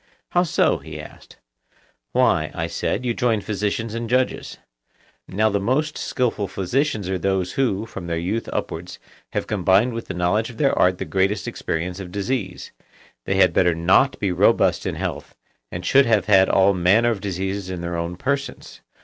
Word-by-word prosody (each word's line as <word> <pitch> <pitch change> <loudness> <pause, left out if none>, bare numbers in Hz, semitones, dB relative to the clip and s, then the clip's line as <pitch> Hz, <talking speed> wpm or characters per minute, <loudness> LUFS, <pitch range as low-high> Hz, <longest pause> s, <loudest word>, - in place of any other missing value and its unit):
How 175 - +3
so? 180 - +2
he - - -9
asked. - - -13 0.7
Why, - - +2
I - - -2
said, 125 - -2
you 120 - +1
join 115 -2 +1
physicians 105 +2 -2
and 115 0 -4
judges. 125 +1 0 0.7
Now 110 +2 +1
the 100 - +1
most 145 +9 0
skilful 115 -5 -1
physicians 105 +3 -1
are 95 -1 -1
those 95 0 0
who, 115 -6 0
from 95 -6 -8
their 85 -1 -2
youth 95 +7 -2
upwards, 85 +2 -4 0.4
have - - -1
combined 100 +4 +2
with 115 - -6
the 95 - -5
knowledge 90 +6 +1
of 120 - -11
their 140 -2 +2
art 90 0 +3
the - - -4
greatest 95 +2 0
experience 90 +3 -3
of 90 -2 -7
disease; 100 -1 -3 0.6
they 95 - +1
had 95 -3 +4
better 90 -2 +3
not 90 +11 +3
be 100 -3 -1
robust 90 - +3
in - - -2
health, - - -5 0.4
and 85 0 -6
should 135 +4 +5
have 105 -5 +3
had 95 -2 +5
all 100 +1 +4
manner 100 +6 +3
of 105 -4 -4
diseases 95 0 -3
in 90 -2 -5
their 85 0 -3
own 85 +1 -3
persons. 140 +8 -4
100 Hz, 180 wpm, -22 LUFS, 90-115 Hz, 0.7 s, should